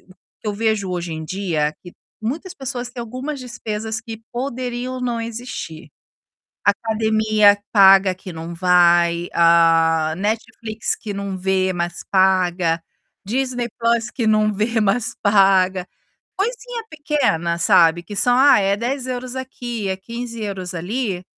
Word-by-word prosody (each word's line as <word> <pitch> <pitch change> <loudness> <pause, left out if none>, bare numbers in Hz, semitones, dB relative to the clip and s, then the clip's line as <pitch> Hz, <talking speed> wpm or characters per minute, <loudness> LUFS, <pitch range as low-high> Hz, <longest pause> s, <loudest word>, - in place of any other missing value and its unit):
o - - -31 0.3
que 215 - -4
eu 205 - -2
vejo 215 -3 0
hoje 175 -2 -3
em 160 0 -5
dia, 155 -4 -1
que 175 - -11 0.3
muitas 320 - -4
pessoas 250 -4 -5
têm 245 - -7
algumas 255 +5 -5
despesas 220 -3 -5
que 225 -1 -9
poderiam 255 0 -4
não 240 -2 -2
existir. 230 - -7 0.8
Academia 215 0 +3
paga 195 -2 +6
que 185 0 -9
não 165 +1 -7
vai, 175 -1 +3
a 165 -1 +4
Netflix 220 +1 -3
que 210 -3 -7
não 200 -1 -4
vê, 185 0 0
mas 175 -1 -3
paga, 180 -3 +2 0.4
Disney 245 +2 -1
Plus 230 -1 +1
que 235 +1 -3
não 215 0 +3
vê, 220 +3 0
mas 210 +3 0
paga, 195 -3 +3 0.5
coisinha 475 +3 -3
pequena, 285 - 0
sabe, 170 0 +4
que 205 +4 -8
são, 245 +4 +3
ah, 280 -4 +6
é 195 0 +2
10€ 250 +2 -4
aqui, 240 -5 -5
é 190 - -1
15€ 210 -4 -6
ali, 185 +1 -3
210 Hz, 135 wpm, -20 LUFS, 180-240 Hz, 0.8 s, paga